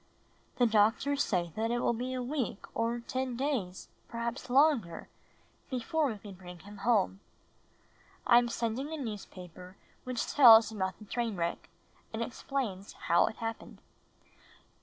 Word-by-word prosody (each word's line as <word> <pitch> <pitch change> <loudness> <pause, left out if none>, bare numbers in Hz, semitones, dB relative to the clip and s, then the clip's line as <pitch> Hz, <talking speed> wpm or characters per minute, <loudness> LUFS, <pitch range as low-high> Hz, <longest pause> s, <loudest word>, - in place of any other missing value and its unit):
The 245 - +4
doctors 230 +6 +3
say 175 - -1
that 225 +1 -1
it 240 - 0
will 240 - +1
he 250 +3 -3
a 250 - -2
week 255 -5 -3
or 230 +1 -1
ten 255 0 -3
days, 240 -10 -2 0.2
perhaps 235 +2 -4
longer, 255 - +2 0.6
before 285 +4 0
%ve 215 - -6
can 205 - -8
bring 180 -1 -11
him 205 +3 -12
home. 200 -3 +1 1.1
I 240 -1 +7
am 240 0 -1
sending 235 +5 -2
a 320 - -3
newspaper 185 - -8 0.3
which 250 -2 -2
tells 225 -5 +8
about 190 -4 -3
the 215 - -13
train 230 0 -2
wreck 170 -2 -3 0.4
and 225 +1 -2
explains 230 -5 -4
how 170 0 +2
it - - -5
happened. 225 0 -6
230 Hz, 145 wpm, -31 LUFS, 200-255 Hz, 1.1 s, tells